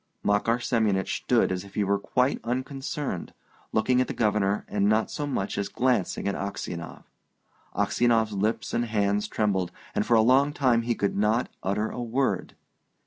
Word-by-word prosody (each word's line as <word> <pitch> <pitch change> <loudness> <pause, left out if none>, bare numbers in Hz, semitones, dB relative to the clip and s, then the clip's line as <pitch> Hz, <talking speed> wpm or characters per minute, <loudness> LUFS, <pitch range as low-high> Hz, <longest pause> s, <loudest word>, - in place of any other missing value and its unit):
Makar 105 +3 +2
Semyonich 110 -6 0
stood - - +2
as 90 0 -2
if 100 -1 -14
he 105 - +1
were 100 0 +1
quite 125 +6 +1
unconcerned, 130 - -4 0.4
looking 125 +3 +2
at 130 - 0
the - - -5
Governor 105 -2 +1
and 100 0 +1
not 110 +1 +2
so 145 - -3
much 100 -8 -2
as 100 -1 -2
glancing 120 -5 0
at 100 - 0
Aksionov. 90 -4 -5 0.7
Aksionov's 115 -3 +2
lips 105 +3 -1
and 120 - +1
hands 105 -2 0
trembled, 95 -4 0 0.2
and - - +1
for 120 - +3
a 110 - +6
long 135 +5 +4
time 125 -5 +3
he 120 0 -1
could 100 - -1
not 110 +4 +1
utter 105 +3 -1
a 125 - -5
word. 125 +3 -1
110 Hz, 170 wpm, -26 LUFS, 100-125 Hz, 0.7 s, a